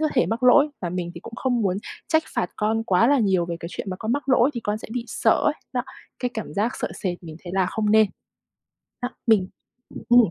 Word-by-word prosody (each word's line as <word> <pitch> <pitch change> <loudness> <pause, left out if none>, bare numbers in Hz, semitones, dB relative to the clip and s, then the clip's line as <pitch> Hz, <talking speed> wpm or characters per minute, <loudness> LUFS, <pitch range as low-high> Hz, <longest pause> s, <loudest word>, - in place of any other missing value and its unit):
có 310 - +2
thể 250 - +3
mắc 230 +3 -2
lỗi 275 +4 +6
và 180 - -2
mình 175 -1 -3
thì - - -8
cũng 230 - -10
không 250 -2 0
muốn 190 -1 +1 0.3
trách 315 0 +3
phạt 180 - 0
con 220 +1 0
quá 210 +2 +4
là 285 0 +4
nhiều 190 -6 +2
về 170 -1 -3
cái 170 - -5
chuyện 195 - -5
mà 185 - -4
con 220 +4 -2
mắc 280 0 -2
lỗi, 260 +1 +5
thì 235 - -3
con 210 -1 -2
sẽ - - -10
bị 245 -1 -2
sợ 225 - +2
ấy, 300 - +3 0.2
đó, 250 -2 0 0.4
cái 250 - -1
cảm 220 - -5
giác 215 +4 +1
sợ - - -1
sệt 180 -2 -2
mình 160 -2 -9
thấy 175 - -7
là 190 -1 +2
không 210 +2 -1
nên. 220 -1 +6 1.0
Đó 245 - -1 0.2
mình 210 -5 +4 0.6
ừ. 240 - +6
220 Hz, 250 wpm, -24 LUFS, 185-245 Hz, 1.0 s, lỗi